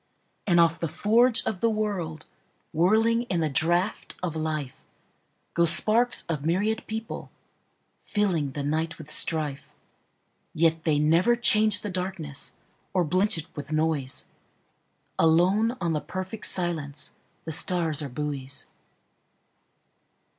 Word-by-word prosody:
And 175 -3 +3
off 165 0 +3
the 165 - -2
forge 225 - +2
of 195 - -3
the 230 - +2
world, 195 -8 -4 0.5
Whirling 220 +7 +2
in 175 -3 -1
the 155 -2 -1
draught 175 +8 0
of 170 -3 -3
life, 155 -4 -4 0.7
Go 170 - +2
sparks 225 +8 +7
of 155 -4 -4
myriad 205 +7 -1
people, 220 +1 -6 0.8
fillingThe 155 -9 -1
night 155 +2 -2
with 155 -1 -8
strife. 150 -4 0 0.9
Yet 165 0 +1
they 155 -3 +2
never 165 +10 +3
change 215 -4 +4
the 210 - -5
darknessOr 180 -6 -5 0.6
blench 185 +5 +2
it 160 - -5
with 145 +1 -8
noise; 155 -4 -1 0.9
Alone 190 +9 +2
on 170 -2 -1
the 150 - -2
perfect 185 +7 -5
silenceThe 160 -2 -4
stars 160 -2 +1
are 145 - -5
buoys. 140 0 -5
170 Hz, 120 wpm, -25 LUFS, 155-205 Hz, 0.9 s, sparks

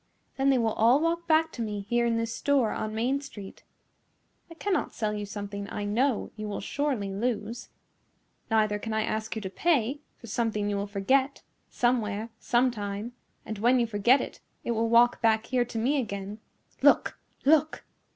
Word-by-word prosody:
Then 270 0 +2
they 270 - +4
will 225 -2 +1
all 235 +5 +4
walk 335 +1 -1
back 320 0 +3
to 235 - -6
me 210 -2 -3
here 235 +4 +1
in 230 -1 +1
this 230 0 -2
store 275 -6 +2
on 215 0 -3
main 255 +5 0
street. 205 -8 -10 0.9
I 330 - -11
can 400 +4 -2
not 315 - -1
sell 215 -1 -1
you 205 -1 -4
something 200 0 -6
I 205 - -3
know 235 +4 0
you 215 -1 -5
will 205 - -4
surely 245 -6 -2
lose. 230 +1 -3 0.8
Neither 215 -2 +2
can 225 +1 -4
I 220 0 +1
ask 220 +1 -3
you 220 - -4
to 190 - -3
pay, 285 - +1 0.2
for - - -13
something 215 -2 -1
you - - -1
will 200 +1 -2
forget, 260 +8 +1 0.3
somewhere 225 -3 0
sometime, 235 -3 -1 0.3
and 215 -2 -5
when 245 +4 +4
you 240 - +3
forget 230 +4 +3
it, - - -7 0.2
it - - -2
will 230 0 0
walk 235 +1 +5
back 225 -1 +3
here 245 0 +1
to 235 -1 -7
me 265 +6 +1
again. 200 -1 -6 0.4
Look - - +4 0.3
look!" 310 +1 +3
230 Hz, 185 wpm, -28 LUFS, 210-260 Hz, 0.9 s, walk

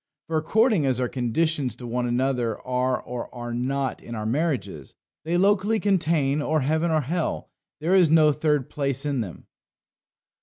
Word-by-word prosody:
For, 160 - -1
according 205 - +2
as 130 -2 +1
our 125 - +1
conditions 135 +3 -1
to 125 - -10
one 120 +1 -1
another 120 -2 0
are 125 0 0
or 125 -1 -7
are 120 -1 -5
not 130 +3 -2
in 120 - -8
our 105 -1 -4
marriages, 115 - -2 0.3
"They 170 +2 +1
locally 205 +3 +2
contain 160 -8 +1
or 155 +1 +1
heaven 160 +5 +1
or 155 -1 +2
hell; 165 +5 -3 0.3
There 165 +5 0
is 180 -4 +5
no 155 -1 +5
third 150 -2 0
place 140 -1 -2
in 140 -4 0
them." 95 -6 -8
140 Hz, 165 wpm, -25 LUFS, 125-160 Hz, 0.3 s, is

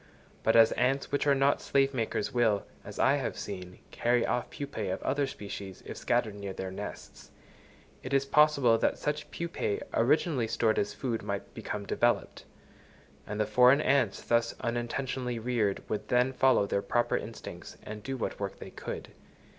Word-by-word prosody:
But 110 - +2
as 115 -1 +7
ants 135 +2 0
which 145 +1 0
are 140 - +5
not 135 +1 +2
slave 140 0 +2
makers, 115 0 -2
will, 115 -5 +2 0.2
as - - -9
I - - +4
have - - -3
seen, 90 -2 -6
carry 120 0 +2
off 125 - -1
pupæ 125 -9 -4
of 95 - -2
other 140 +1 +1
species, 100 -5 -8
if - - -6
scattered 120 -3 0
near 100 -1 -6
their 95 0 -5
nests, 95 - -8 0.7
it 130 - -7
is 135 0 +3
possible 140 -5 +4
that - - +1
such 150 0 -3
pupæ 170 -11 -3
originally 135 0 +2
stored 110 0 +1
as 100 - -2
food 120 -4 -2
might 100 -2 -5
become 105 -1 -5
developed; - - 0 0.8
and 105 0 -4
the 105 - +3
foreign 125 +5 +6
ants 140 -2 +2
thus 115 0 +1
unintentionally 120 +1 -2
reared 115 -4 -1
would 105 0 -3
then 125 +2 +2
follow 130 -5 +4
their 100 - 0
proper 120 +3 +1
instincts, - - -7
and 105 0 -7
do 135 +4 -4
what 115 - -3
work 100 -1 -4
they - - -9
could. - - -6
120 Hz, 170 wpm, -30 LUFS, 105-135 Hz, 0.8 s, as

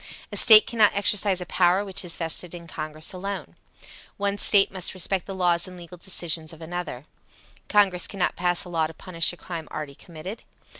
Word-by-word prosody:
A - - -6
State 215 -1 +10
cannot 220 -3 +2
exercise 200 -2 +1
a - - -4
power 180 +3 +1
which 195 -1 -3
is 175 -2 -2
vested 170 +1 -3
in 170 -1 -11
Congress 155 0 -7
alone. 195 +2 -7 0.6
One 200 0 -2
State 200 -2 +4
must 185 -1 -1
respect 185 +1 -1
the 195 - -6
laws 175 -2 0
and 180 0 -11
legal 175 0 -13
decisions 165 -3 -2
of 160 - -14
another. 165 -5 -7 0.6
Congress 195 -4 +2
cannot 195 -3 -2
pass 175 -1 0
a - - -11
law 165 -2 -1
to 160 - -14
punish 165 -2 0
a 175 - -13
crime 165 -4 -8
already 150 -2 -7
committed. 170 +8 -10
180 Hz, 190 wpm, -24 LUFS, 165-195 Hz, 0.6 s, State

